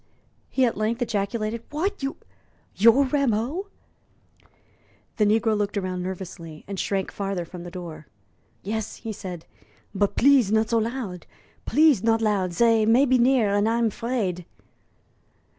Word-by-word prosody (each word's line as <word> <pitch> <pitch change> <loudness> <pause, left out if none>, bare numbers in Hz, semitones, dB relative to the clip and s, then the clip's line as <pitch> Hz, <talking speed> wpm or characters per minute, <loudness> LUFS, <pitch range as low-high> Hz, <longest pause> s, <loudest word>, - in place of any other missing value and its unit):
he 260 - +2
at 235 - 0
length 220 +3 -1
ejaculated. 215 +1 -2
"What! 370 +6 -2
You 275 0 -3 0.6
you're 230 +6 +6
Rameau?" 275 - 0 1.5
The 210 -3 +3
negro 220 +1 +2
looked 205 0 -2
round 185 -2 -2
nervously, 180 -4 -7
and 195 -1 -5
shrank 195 -2 -1
farther 195 -3 -3
from 180 +1 -10
the 175 - -8
door. 170 -5 -9 0.6
"Yes," 220 +2 -3
he 225 -2 -6
said; 180 -5 -8 0.5
"but 200 0 0
please 260 -6 +4
not 220 +1 +2
so 230 - +3
loud 220 -6 -4 0.4
please 305 -8 +4
not 225 0 +2
loud. 205 -5 0
Zey 225 +4 +3
may 235 +6 +4
be 255 -1 +3
near, 240 -4 +3
and 205 +2 +2
I'm 230 -1 +1
'fraid." 210 -7 -2
215 Hz, 140 wpm, -24 LUFS, 195-235 Hz, 1.5 s, you're